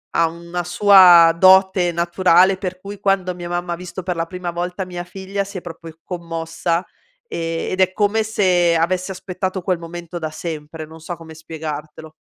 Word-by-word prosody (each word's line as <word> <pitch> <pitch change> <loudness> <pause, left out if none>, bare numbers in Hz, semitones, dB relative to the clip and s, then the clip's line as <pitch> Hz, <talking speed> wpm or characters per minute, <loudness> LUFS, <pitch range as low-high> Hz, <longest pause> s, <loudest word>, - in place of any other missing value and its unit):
Ha 165 - +4
una 170 +1 -6
sua 175 -3 +7
dote 190 -1 +5
naturale, 180 +2 +3
per 185 -1 -5
cui, 200 0 -8
quando 195 -2 0
mia 175 -1 -7
mamma 175 0 -3
ha - - -3
visto 180 +1 -8
per 180 0 -2
la 165 - -1
prima 180 0 -5
volta 180 +2 -4
mia 175 -1 -6
figlia 195 +2 -4
si 200 0 -8
è 180 - -6
proprio 165 -1 -10
commossa 170 0 -3 0.4
e 165 - -3
ed 185 - -3
è 185 - +3
come 215 +1 +1
se 185 -6 +2
avesse 180 +3 0
aspettato 185 0 -4
quel 180 0 0
momento 170 +1 -8
da 160 -1 -3
sempre. 155 -1 -6
Non 160 +1 -13
so 175 +2 -6
come 165 -1 -12
spiegartelo. 155 -1 -7
175 Hz, 180 wpm, -20 LUFS, 165-185 Hz, 0.4 s, sua